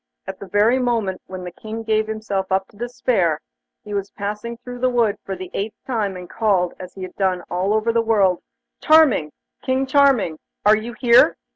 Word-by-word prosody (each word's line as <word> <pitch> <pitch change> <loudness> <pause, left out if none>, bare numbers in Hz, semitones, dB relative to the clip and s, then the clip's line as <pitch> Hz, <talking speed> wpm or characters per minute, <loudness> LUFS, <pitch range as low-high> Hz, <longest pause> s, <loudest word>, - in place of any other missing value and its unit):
At 190 0 -7
the 200 - -9
very 215 +6 +3
moment 230 -7 -1
when 185 -1 -7
the 180 - -6
King 220 +5 -7
gave 220 -1 +1
himself 205 -3 -3
up 190 0 +1
to - - -22
despair, 215 -8 0 0.4
he 210 - -8
was 200 -1 -2
passing 210 +4 -5
through 245 +1 -9
the 255 +1 +2
wood 235 -4 +2
for 195 - -4
the 185 -1 -8
eighth 210 +2 -3
time, 210 -7 -2
and 180 -1 -9
called, 190 -4 +1
as 185 -1 -9
he 190 - -7
had 185 - -7
done 185 -2 0
all 180 +3 0
over 220 +2 +1
the 230 - +3
world: 200 -6 +2 0.4
'Charming! 305 - +5 0.3
King 260 +1 0
Charming! 265 - +3 0.3
Are 210 +1 +7
you 225 +3 -5
here? 235 +1 +5
210 Hz, 195 wpm, -21 LUFS, 190-235 Hz, 0.4 s, Are